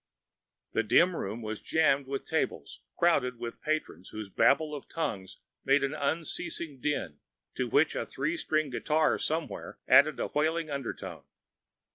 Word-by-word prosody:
The - - +2
dim 165 - +4
room 110 0 -4
was 110 0 -4
jammed 140 -4 +2
with 135 0 -4
tables - - -2 0.2
crowded 125 -8 +2
with 120 0 -7
patrons 155 - -3
whose 110 -2 -7
babel 150 - +3
of 145 - -7
tongues 100 - -3 0.3
made 135 +1 +3
an 140 +1 0
unceasing 160 - -3
din, 95 - -2 0.3
to - - -2
which - - +3
a - - -2
three 150 +5 -2
string 155 -3 0
guitar 155 +5 +1
somewhere 160 +1 -3
added 150 +2 +6
a - - 0
wailing 155 +1 0
undertone. 140 -3 -5
145 Hz, 145 wpm, -30 LUFS, 120-155 Hz, 0.3 s, added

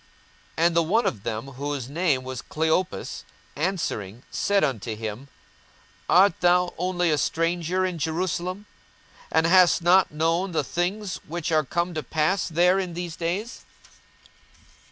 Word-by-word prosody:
42:024:018 165 - +3
And 170 -1 +3
the 170 - +5
one 205 +9 +1
of 105 - -1
them, 110 +3 -4
whose 140 -1 -4
name 145 -3 0
was 130 -1 -5
Cleopas, 160 +4 -1 0.3
answering 135 - -3
said 200 -1 +1
unto 115 -6 -2
him, 110 +4 -6 0.8
Art 190 +1 +6
thou 180 +1 +3
only 180 -1 +1
a 150 - +1
stranger 170 +4 0
in 180 -3 -3
Jerusalem, 180 +4 -2 0.7
and 160 0 +3
hast 180 0 +5
not 185 +2 +5
known 165 +4 0
the - - +1
things 190 +3 -2
which 170 +1 -3
are 155 -1 +3
come 170 +5 -2
to 155 - -2
pass 155 +8 0
there 180 +3 +3
in 180 -3 -4
these 175 -1 -5
days? 185 +9 -3
170 Hz, 145 wpm, -25 LUFS, 150-180 Hz, 0.8 s, Art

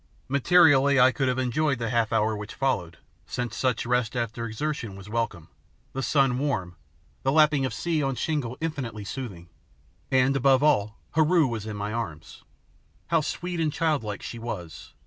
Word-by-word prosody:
Materially 140 -1 +5
I 130 +1 +7
could 135 +1 -1
have 125 0 0
enjoyed 135 +3 +1
the 115 -1 -3
half 115 -2 +1
hour 110 0 +2
which 105 0 -7
followed, 90 -12 -1 0.3
since 120 +4 -4
such 125 0 0
rest 125 -2 0
after 115 -1 -2
exertion 115 -2 -4
was 100 +1 -11
welcome, 105 -8 -2 0.5
the 135 - -3
sun 135 -2 +2
warm, 95 -12 -2 0.5
the 135 - +1
lapping 150 -2 +4
of - - -6
sea 160 +5 -1
on 135 -2 -1
shingle 130 -1 -2
infinitely 130 -10 -4
soothing, 100 -9 -6 0.6
and, 130 +1 +3
above 135 0 +4
all, 110 -8 +2
Heru 160 +1 +4
was 115 -4 -3
in 105 -1 -5
my 105 +1 -3
arms! 90 -10 -6 0.7
How 165 -2 +3
sweet 175 +3 -4
and 155 -2 +1
childlike 140 - -1
she 120 - -6
was! 90 -9 -7
125 Hz, 165 wpm, -26 LUFS, 110-145 Hz, 0.7 s, I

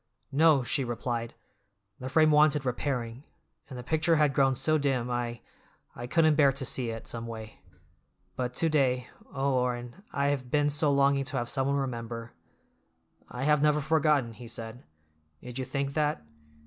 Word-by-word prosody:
"No," 150 -1 +4
she 135 +3 -1
replied, 120 -1 -4 0.6
"the 130 - -5
frame 155 +3 +4
wanted 150 -2 +4
repairing, 125 -1 -3 0.5
and 130 - -8
the 125 - -7
picture 160 +4 +2
had 150 -3 +3
grown 135 -2 +3
so 155 +4 +2
dim 130 -4 -1
I—I 120 0 -7
couldn't 155 +2 +3
bear 145 -2 +5
to 135 0 -4
see 125 -1 0
it, 115 0 -6
someway. 115 -2 -7 0.8
But 125 -1 -3
to 165 - +2
day—oh, 135 -1 -1
Orrin, 125 +3 -2
I 140 0 0
have 130 -3 -2
been 145 0 +2
so 150 0 +2
longing 140 0 +3
to 135 0 -3
have 120 -1 -2
someone 135 +1 0
remember—" 115 -3 -4 1.0
"I 125 - -5
have 150 0 +3
never 150 0 +3
forgotten," 150 -5 +1
he 120 +2 -11
said; 115 +1 -6 0.6
"did 125 +4 -8
you 130 - -2
think 140 +1 -3
that? 150 - -1
135 Hz, 160 wpm, -28 LUFS, 120-145 Hz, 1.0 s, bear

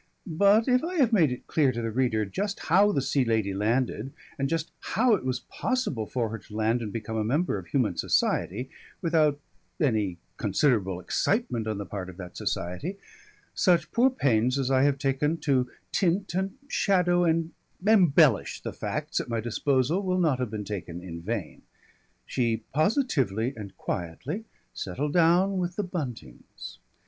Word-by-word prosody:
But 200 - +4
if 250 +1 +3
I 355 +3 -3
have 260 -8 +3
made 165 -10 +4
it 125 - -6
clear 145 -5 +2
to 120 - -4
the 115 -1 -2
reader 110 -3 +1
just 200 - -3
how 195 +6 +4
the 140 - 0
Sea 135 -1 +1
Lady 110 -4 0
landed 115 +4 0 0.3
and 135 0 0
just 165 +1 -2 0.3
how 240 +1 +5
it 205 - +1
was 130 -1 -2
possible 250 - -2
for 120 -3 -1
her 115 +1 -5
to 105 - -13
land 110 +2 +1
and 110 -3 -4
become 110 0 -4
a 110 - +1
member 135 - 0
of 85 - -12
human 120 -7 +1
society 125 +8 0 0.3
without 155 -4 +3 0.4
any 110 - +1 0.2
considerable 105 - +1
excitement 120 - 0
on 110 -2 -2
the 100 - -4
part 95 0 -6
of 90 - -11
that 90 -2 -9
society, 90 - -3 0.6
such 175 -3 +2
poor 245 +3 +4
pains 125 - +1
as 135 -1 0
I 130 -1 +4
have 140 -1 +2
taken 145 +3 0
to 130 -4 +1 0.2
tint 190 +1 +1
and 190 +3 -1
shadow 180 -7 +2
and 165 -1 +1 0.3
embellish 165 - +4
the - - -4
facts - - -3
at - - -5
my 115 -1 -1
disposal 130 - +1
will 185 -1 0
not 155 -7 +2
have 125 -3 -1
been 105 -1 -5
taken 90 -3 -6
in 85 -2 -7
vain. 100 -2 -4 0.6
She 115 -3 -1
positively 140 - +1
and 100 -4 -9
quietly 130 - -4 0.3
settled 140 +11 -3
down 180 +3 +4
with 175 0 -2
the 210 - -1
Buntings. 135 - -7
135 Hz, 170 wpm, -27 LUFS, 110-175 Hz, 0.6 s, how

